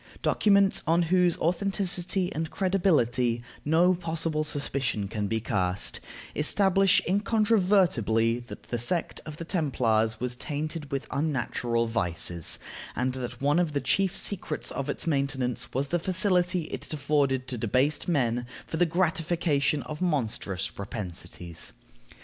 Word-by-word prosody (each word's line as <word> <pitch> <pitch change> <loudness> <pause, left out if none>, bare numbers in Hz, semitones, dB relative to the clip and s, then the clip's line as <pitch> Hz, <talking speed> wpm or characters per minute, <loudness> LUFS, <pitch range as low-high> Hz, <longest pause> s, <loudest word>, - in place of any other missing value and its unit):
Documents 200 -2 +4
on 170 +2 +4
whose 180 -2 +4
authenticity 180 +1 0
and 160 +1 -2
credibility 130 - +1 0.2
no 170 +5 +4
possible 165 -3 -2
suspicion 140 -8 -1
can 105 0 -2
be 110 +2 0
cast, 95 -4 -1 0.4
establish 195 +4 +3
incontrovertibly 185 - +2
that 120 +1 -10
the 120 - -3
sect 170 +8 -1
of 155 -1 -7
the 165 - -6
Templars 115 - +1
was 125 0 -2
tainted 150 +3 -4
with 140 0 -2
unnatural 120 -5 0
vices, 90 -6 -1 0.4
and 125 0 0
that 125 -1 -5
one 145 +4 +3
of 170 -4 0
the 145 - +1
chief 195 +4 +1
secrets 175 -6 -2
of 140 - -3
its - - -2
maintenance 135 -5 -1
was 135 +2 -1
the 175 - +1
facility 180 -1 +2
it - - -6
afforded 140 -3 +1
to 125 - -3
debased 130 +7 +1
men 120 -7 +1 0.2
for 160 - -4
the 175 +1 +3
gratification 165 -4 +1
of 150 +2 -7
monstrous 115 - 0
propensities. 90 -4 -7
150 Hz, 130 wpm, -27 LUFS, 120-175 Hz, 0.4 s, Documents